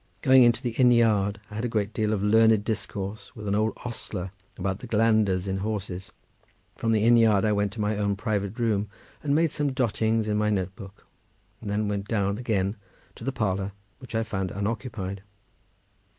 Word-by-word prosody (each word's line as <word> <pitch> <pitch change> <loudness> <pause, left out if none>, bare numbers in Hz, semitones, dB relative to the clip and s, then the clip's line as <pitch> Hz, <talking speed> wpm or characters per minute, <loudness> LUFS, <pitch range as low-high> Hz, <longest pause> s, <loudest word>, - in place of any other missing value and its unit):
Going 130 -1 +7
into 120 +1 +4
the 120 - -1
inn 125 +1 +4
yard, 105 -3 +3
I - - -9
had 110 +2 -3
a - - +1
great 110 -3 -1
deal 110 -1 0
of 105 -2 0
learned 110 0 +5
discourse 105 +2 -4
with 105 -2 -7
an 100 - 0
old 110 +2 +1
ostler 100 -6 -5 0.3
about 95 +1 -2
the - - -9
glanders 105 -4 +2
in 95 0 -1
horses. 95 -2 -4 0.6
From 115 - -1
the 110 -1 +2
inn 120 +1 +6
yard 110 -3 +4
I 105 - +2
went 100 -1 +1
to 110 - -8
my 105 0 0
own 100 -1 0
private 100 0 -2
room, 105 -4 0 0.3
and 145 -1 +1
made 165 -1 +3
some 145 -3 -1
dottings 115 -3 +1
in 105 0 +1
my 105 0 +1
notebook, 95 0 -4 0.6
and - - -6
then 105 +1 0
went 100 -1 -2
down 100 -1 0
again 105 -4 -1 0.4
to - - -12
the 135 - -1
parlour, 100 -5 -1 0.3
which 125 -2 -9
I 115 - +1
found 95 -4 -3
unoccupied. 100 -2 -4
105 Hz, 195 wpm, -26 LUFS, 100-115 Hz, 0.6 s, Going